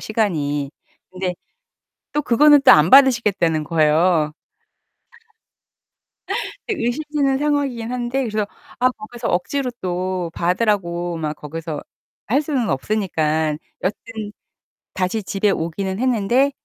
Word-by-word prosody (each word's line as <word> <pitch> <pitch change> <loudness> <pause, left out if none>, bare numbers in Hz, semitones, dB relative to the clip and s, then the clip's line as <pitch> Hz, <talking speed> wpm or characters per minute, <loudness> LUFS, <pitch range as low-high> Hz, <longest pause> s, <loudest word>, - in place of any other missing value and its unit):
시간이. 145 -10 -1 0.4
근데 185 -1 -3 0.8
또 295 - 0
그거는 290 +3 +6
또 - - +7
안 155 +1 +5
받으시겠다는 210 - +4
거예요 155 0 +2 2.4
네. 430 - -1
의심되는 275 +2 0
상황이긴 280 -6 -1
한데 250 +2 -1
그래서 215 -1 -1 0.3
아 255 - +4
거기서 235 +1 -7
억지로 225 +10 -1
또 180 -1 -2
받으라고 175 -2 0
막 155 -1 -3
거기서 155 0 -6 0.4
할 270 +7 +2
수는 275 -7 -1
없으니까 155 -2 0 0.3
여튼 210 +2 -4 0.6
다시 190 +4 -1
집에 200 +1 0
오기는 190 +3 -2
했는데 250 +2 +2
200 Hz, 250 characters per minute, -20 LUFS, 170-245 Hz, 2.4 s, 또